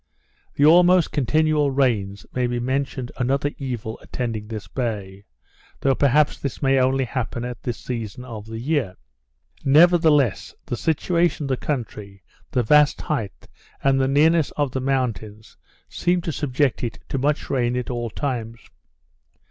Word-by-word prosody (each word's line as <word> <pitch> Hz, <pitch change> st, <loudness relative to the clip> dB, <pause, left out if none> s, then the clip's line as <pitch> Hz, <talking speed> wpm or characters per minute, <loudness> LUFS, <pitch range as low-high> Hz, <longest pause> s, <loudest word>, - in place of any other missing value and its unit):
The 145 Hz, -, +3 dB
almost 175 Hz, +2 st, +5 dB
continual 150 Hz, +2 st, +2 dB
rains 110 Hz, -8 st, 0 dB
may 125 Hz, -1 st, 0 dB
be 120 Hz, 0 st, -2 dB
reckoned 130 Hz, 0 st, -2 dB
another 135 Hz, +3 st, 0 dB
evil 120 Hz, -5 st, -5 dB
attending 115 Hz, -4 st, -4 dB
this 110 Hz, -2 st, -7 dB
bay; 105 Hz, -6 st, -4 dB, 0.6 s
though 135 Hz, -, +3 dB
perhaps 145 Hz, +2 st, +2 dB
this 140 Hz, -, -4 dB
may 135 Hz, -1 st, +3 dB
only 130 Hz, +1 st, +2 dB
happen 120 Hz, -1 st, -4 dB
at 125 Hz, -2 st, -6 dB
this 120 Hz, -2 st, -4 dB
season 120 Hz, -1 st, -6 dB
of 110 Hz, -4 st, -8 dB
the 110 Hz, 0 st, -6 dB
year. 125 Hz, -, -1 dB, 0.7 s
Nevertheless, 150 Hz, -, +4 dB
the -, -, -3 dB
situation 170 Hz, +3 st, 0 dB
of 140 Hz, -, -4 dB
the 130 Hz, -, 0 dB
country, 105 Hz, -9 st, -5 dB, 0.3 s
the 125 Hz, -, 0 dB
vast 150 Hz, +5 st, +4 dB
height, 115 Hz, -10 st, -4 dB, 0.4 s
and 135 Hz, -1 st, +3 dB
nearness 150 Hz, +4 st, +3 dB
of 145 Hz, -3 st, 0 dB
the 130 Hz, -, -3 dB
mountains, 115 Hz, -5 st, -3 dB, 0.3 s
seem 175 Hz, +1 st, 0 dB
to 165 Hz, -, -3 dB
subject 140 Hz, -2 st, 0 dB
it 115 Hz, -, -3 dB
to 135 Hz, -, -2 dB
much 145 Hz, +3 st, -1 dB
rain 125 Hz, -2 st, +1 dB
at 125 Hz, 0 st, -3 dB
all 120 Hz, -1 st, -3 dB
times. 115 Hz, -2 st, -4 dB
130 Hz, 150 wpm, -22 LUFS, 115-145 Hz, 0.7 s, almost